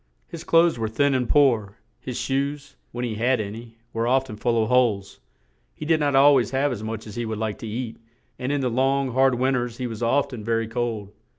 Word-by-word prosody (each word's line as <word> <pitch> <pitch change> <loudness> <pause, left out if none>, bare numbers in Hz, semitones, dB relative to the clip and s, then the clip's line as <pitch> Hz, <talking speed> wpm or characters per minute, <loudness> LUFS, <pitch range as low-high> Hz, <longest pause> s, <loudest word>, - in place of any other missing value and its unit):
His - - -8
clothes 165 -5 +3
were 110 - -1
thin 140 +5 +2
and 125 -2 0
poor, 115 -8 +3 0.2
his 125 -2 -6
shoes, 140 +1 -2 0.2
when 120 +1 -3
he 115 - -3
had 120 +3 +1
an 100 -1 -4
y, 115 0 -11 0.2
were 115 +1 -1
oft 130 0 +1
en - - -6
full 115 +1 +1
of - - -2
holes; 105 -6 +1 0.6
he 155 - -7
did 160 0 +2
not 145 -2 +1
al 140 +2 +7
ways 125 -6 +2
have 135 +2 +1
as 115 -4 -4
much 110 0 -5
as 105 -2 -9
he 120 - -1
would 110 -1 -3
like 110 -1 -3
to 115 - -6
eat, 115 +1 -5 0.4
and 130 +2 -2
in 145 -1 0
the 125 -2 0
long, 135 +2 +1
hard 130 +1 +3
win 130 +2 +1
ters 120 -2 -2
he 125 - -3
was 115 -2 -6
oft 140 +4 +1
en 110 -4 -6
ver 115 +1 +1
y - - -3
cold. 115 -3 -3
120 Hz, 250 wpm, -24 LUFS, 110-135 Hz, 0.6 s, al